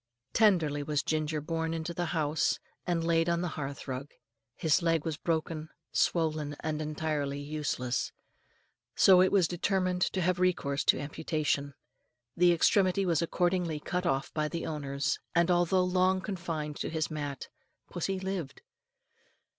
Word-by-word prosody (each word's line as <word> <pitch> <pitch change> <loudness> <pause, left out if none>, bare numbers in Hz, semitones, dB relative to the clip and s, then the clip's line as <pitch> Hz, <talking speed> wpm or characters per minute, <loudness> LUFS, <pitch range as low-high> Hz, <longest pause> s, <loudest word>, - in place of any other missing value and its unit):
Tenderly 170 -10 +3
was 150 0 -1
Ginger 155 -1 -1
borne 165 +1 -2
into 165 +1 -4
the 175 0 -2
house, 155 -1 +1 0.3
and 170 -2 +1
laid 165 0 +2
on 170 0 +1
the 180 - -1
hearth 140 -2 -5
rug. 135 +2 -4 0.5
His 155 -3 +2
leg 165 -2 +1
was 160 -2 -1
broken, 160 -1 -2 0.2
swollen, 155 -3 +1
and 155 -1 -2
entirely 150 -2 -2
useless; 145 -4 -2 0.8
so 185 -2 +7
it 185 - +4
was 190 -5 +4
determined 185 0 0
to 185 - +1
have 180 +1 +1
recourse 165 -6 +1
to - - +4
amputation. 145 -2 -2 0.6
The 175 0 +5
extremity 185 +3 +3
was 170 -3 +2
accordingly 175 -2 0
cut 180 +4 -2
off 135 -2 -1
by 155 -1 0
the 170 +2 -4
owners, 140 -3 -2 0.2
and, 170 +1 +4
although 175 +1 +3
long 185 +1 +2
confined 165 -6 -4
to - - -3
his 160 -1 -2
mat, 145 -3 -5 0.4
pussy 185 +2 -2
lived. 185 -7 -4
160 Hz, 145 wpm, -30 LUFS, 150-180 Hz, 0.8 s, so